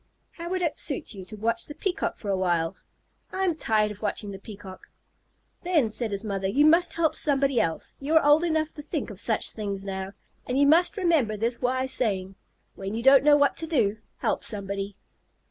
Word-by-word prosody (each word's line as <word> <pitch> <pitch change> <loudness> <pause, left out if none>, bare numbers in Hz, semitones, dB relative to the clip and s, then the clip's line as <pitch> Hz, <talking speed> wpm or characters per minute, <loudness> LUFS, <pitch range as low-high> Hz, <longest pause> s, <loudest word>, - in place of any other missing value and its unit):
"How 340 0 -7
would 370 0 -1
it 325 - -1
suit 335 - -2
you 190 -3 -9
to 200 - -9
watch 230 +2 0
the 295 - -8
Peacock 385 0 -2
for 205 - -4
a - - +2
while?" 175 -3 0 0.6
"I'm 380 -2 0
tired 215 -7 +1
of 205 - -11
watching 205 -1 -3
the 195 - -8
Peacock." 195 -2 -11 0.7
"Then," 315 -11 +1
said 220 +1 0
the 200 +2 -4
mother, 195 -1 -1
"you 275 +10 +3
must 335 +1 +4
help 330 -2 +1
somebody 275 -3 +1
else. 165 -1 -3
You 290 +4 -1
are 320 - +5
old 295 +3 +5
enough 315 -2 0
to 295 - -8
think 295 -5 -4
of 195 - -9
such 220 0 -1
things 200 -3 -4
now, 190 0 -5 0.3
and 255 - -1
you 285 - +5
must 335 +8 +4
remember 315 - +2
this 230 +3 -1
wise 260 +1 0
saying: 195 -5 -1 0.4
'When 195 +2 -5
you 230 - -3
don't 270 +1 +7
know 295 0 +6
what 285 -1 +3
to 325 - -3
do, 225 -10 +1 0.2
help - - -1
somebody.'" 200 -1 -5
235 Hz, 205 wpm, -26 LUFS, 200-305 Hz, 0.7 s, don't